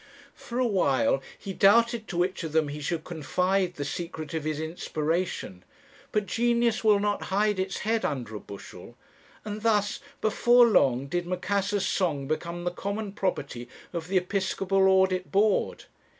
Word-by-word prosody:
For 240 - -7
a 255 - +2
while 135 - +2 0.2
he 195 - -6
doubted 230 +3 +4
to 175 - -5
which 180 +1 0
of 160 -2 -5
them 160 -2 +2
he 150 +1 -6
should 160 +2 -2
confide 180 +3 0
the 145 - -4
secret 160 +1 -5
of 160 -2 -3
his 155 -1 -2
inspiration; 160 - -3 0.5
but 210 -1 0
genius 235 +3 +1
will 210 -2 +5
not 205 0 -1
hide 205 0 +1
its 190 +1 -2
head 225 +1 +1
under 125 -7 -3
a 105 - -5
bushel; 100 -1 -11 0.5
and 210 0 -5
thus, 210 -2 +1 0.2
before 240 +3 +5
long, 135 - +3
did 175 +4 -2
Macassar's 195 +2 -1
song 150 -8 0
become 170 +3 -3
the 175 - -1
common 200 +3 -4
property 140 -11 -3 0.2
of 165 -2 -4
the 190 +1 +1
Episcopal 190 +1 +1
Audit 190 -1 +2
Board. 205 +1 +1
185 Hz, 160 wpm, -27 LUFS, 160-205 Hz, 0.5 s, will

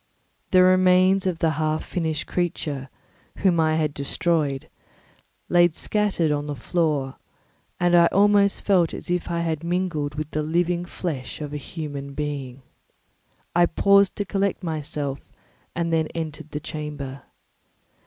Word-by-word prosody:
The 185 -1 +6
remains 185 +1 +4
of 180 -3 -1
the 165 -1 +1
half 155 +1 -1
finished 160 -3 -2
creature, 150 -6 -2 0.5
whom 180 -4 +2
I 155 -1 +3
had 155 -2 0
destroyed, 145 -1 -1 0.8
lay 175 0 +5
scattered 200 -5 0
on 145 0 -1
the 145 - -3
floor, 150 -4 -1 0.6
and 175 0 +3
I 170 -1 +7
almost 200 +1 +3
felt 180 -5 +3
as - - -6
if 180 0 -1
I 170 0 -1
had 160 -2 -2
mangled 170 -5 -1 0.2
the 155 - -1
living 175 +3 0
flesh 160 -7 -5
of 150 -1 -6
a - - -2
human 140 -2 -6
being. 140 -3 -4 0.9
I 175 0 +5
paused 200 +1 +4
to 205 - -2
collect 195 0 -1
myself 150 -4 -3 0.6
and 170 -1 -1
then 160 -1 +2
entered 155 -2 -5
the 150 - -4
chamber. 150 -3 -6
165 Hz, 140 wpm, -24 LUFS, 150-180 Hz, 0.9 s, I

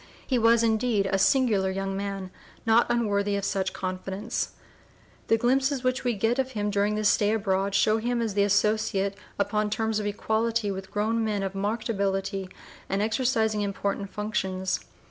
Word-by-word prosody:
He 255 -3 +1
was 230 0 +5
indeed 220 -2 +2
a 195 - +3
singular 210 -5 +3
young 195 0 -2
man, 195 -1 -4 0.3
not 225 +1 +4
unworthy 205 -4 +1
of 200 -1 -2
such 190 -1 -1
confidence! 190 +4 -4 0.7
The 225 - +4
glimpses 265 +3 +1
which 255 0 0
we 245 -2 0
get 225 +5 +1
of 260 0 -1
him 210 -1 -1
during 205 +1 +1
this 215 0 +1
stay 210 +1 +3
abroad 195 -2 0
show 215 +2 +4
him 240 +1 -1
as 225 -3 -1
the 200 - +2
associate 200 -1 +1 0.2
upon 210 +1 0
terms 220 0 0
of 205 - -2
equality 220 +1 0
with 190 0 -6
grown 225 +2 0
men 210 -2 -1
of 195 0 -3
marked 205 +4 -2
ability 195 -2 -1 0.4
and 195 - 0
exercising 220 -1 +1
important 200 0 -2
functions. 190 -3 -2
210 Hz, 165 wpm, -27 LUFS, 195-225 Hz, 0.7 s, was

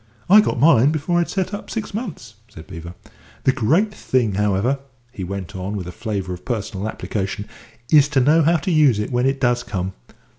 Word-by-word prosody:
"I 210 +2 +9
got 165 - -1
mine 140 -1 +5
before 160 +3 0
I'd 170 - 0
set 190 0 -2
up 205 - -6
six 220 -2 -4
months," 190 - -6 0.2
said 80 - -12
Beevor. 85 -2 -9 0.5
"The 130 - +4
great 160 - +1
thing, 125 - 0
however," 105 +7 +1 0.3
he 100 -6 -7
went 95 -1 -6
on, 95 +3 -4
with 95 - -5
a 90 - -6
flavour 100 -2 -4
of 90 0 -9
personal 105 -3 -3
application, 105 -1 -4 0.5
"is 145 -2 +6
to 145 -2 +1
know 150 +6 +4
how 165 +3 +3
to 160 +5 -3
use 150 -8 +4
it 105 +5 -3
when 125 +1 +1
it 135 0 0
does 120 -2 +2
come. 95 -5 -4
120 Hz, 200 wpm, -21 LUFS, 100-155 Hz, 0.5 s, I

